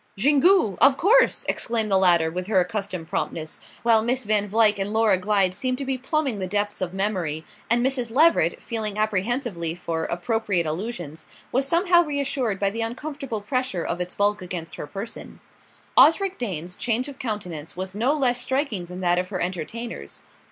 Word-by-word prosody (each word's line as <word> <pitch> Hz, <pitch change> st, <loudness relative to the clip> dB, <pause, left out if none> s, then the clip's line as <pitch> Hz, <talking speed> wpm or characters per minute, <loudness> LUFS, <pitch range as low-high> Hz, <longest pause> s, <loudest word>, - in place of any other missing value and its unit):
"Xingu, 285 Hz, -, +4 dB
of 275 Hz, -1 st, +6 dB
course!" 480 Hz, +7 st, +4 dB
exclaimed 225 Hz, -3 st, 0 dB
the 195 Hz, -, +5 dB
latter 170 Hz, -3 st, +3 dB
with 180 Hz, +2 st, -4 dB
her 205 Hz, -3 st, +3 dB
accustomed 185 Hz, -2 st, -3 dB
promptness, 155 Hz, -1 st, -4 dB, 0.2 s
while 230 Hz, -2 st, +4 dB
Miss 250 Hz, +2 st, 0 dB
Van 205 Hz, -1 st, +2 dB
Vluyck 210 Hz, 0 st, +3 dB
and 195 Hz, +1 st, -2 dB
Laura 220 Hz, -2 st, +3 dB
Glyde 190 Hz, 0 st, +1 dB
seemed 255 Hz, +5 st, -1 dB
to 275 Hz, -, -4 dB
be 265 Hz, 0 st, 0 dB
plumbing 265 Hz, -3 st, -1 dB
the 185 Hz, -, -2 dB
depths 205 Hz, +1 st, -2 dB
of 180 Hz, -2 st, -2 dB
memory, 185 Hz, -6 st, -2 dB, 0.2 s
and 240 Hz, +2 st, +3 dB
Mrs. 255 Hz, -3 st, -1 dB
Leveret, 275 Hz, -, +3 dB
feeling 215 Hz, -3 st, -3 dB
apprehensively 215 Hz, -4 st, -1 dB
for 165 Hz, -2 st, -3 dB
Appropriate 185 Hz, -1 st, -1 dB
Allusions, 160 Hz, -2 st, -5 dB, 0.2 s
was 270 Hz, +2 st, +1 dB
somehow 345 Hz, +3 st, +4 dB
reassured 275 Hz, -, -1 dB
by 200 Hz, -1 st, +1 dB
the 230 Hz, +2 st, -4 dB
uncomfortable 260 Hz, 0 st, -4 dB
pressure 255 Hz, -6 st, -2 dB
of 175 Hz, +1 st, -3 dB
its 180 Hz, 0 st, -5 dB
bulk 205 Hz, 0 st, +1 dB
against 175 Hz, -3 st, -6 dB
her -, -, -6 dB
person. 200 Hz, +8 st, -8 dB, 0.6 s
Osric 380 Hz, +4 st, +5 dB
Dane's 180 Hz, -6 st, -3 dB
change 245 Hz, +2 st, 0 dB
of 280 Hz, -2 st, -10 dB
countenance 180 Hz, -10 st, -5 dB
was 190 Hz, 0 st, -4 dB
no 230 Hz, +7 st, +1 dB
less 255 Hz, -5 st, +1 dB
striking 260 Hz, -, -1 dB
than 180 Hz, +1 st, -8 dB
that 175 Hz, 0 st, +2 dB
of 180 Hz, 0 st, -3 dB
her 190 Hz, -3 st, -3 dB
entertainers. 185 Hz, +7 st, -5 dB
210 Hz, 175 wpm, -24 LUFS, 180-255 Hz, 0.6 s, of